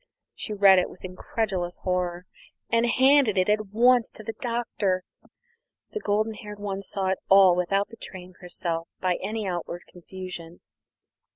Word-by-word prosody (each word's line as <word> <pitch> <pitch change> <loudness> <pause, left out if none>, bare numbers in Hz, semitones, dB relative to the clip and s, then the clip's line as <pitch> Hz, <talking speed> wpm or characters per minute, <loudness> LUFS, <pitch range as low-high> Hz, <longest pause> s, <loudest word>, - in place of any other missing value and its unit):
She - - -6
read 200 -2 +6
it 180 - -1
with 185 - -11
incredulous 185 -1 -3
horror, 180 -1 -1 0.5
and 230 +1 +3
handed 260 -4 +4
it 185 +2 +2
at 215 0 +1
once 240 +3 +4
to 215 - -11
the 225 - -5
Doctor. 230 -6 -1 0.9
The 430 - -3
golden 215 - 0
haired 210 -1 -9
one 200 -1 -4
saw 195 -1 -2
it 190 - 0
all 195 -2 +7
without 195 +3 0
betraying 185 -5 -10
herself 170 -2 -3
by 180 -1 0
any 220 0 -3
outward 175 -1 -4
confusion. 180 -1 -9
195 Hz, 150 wpm, -26 LUFS, 180-215 Hz, 0.9 s, all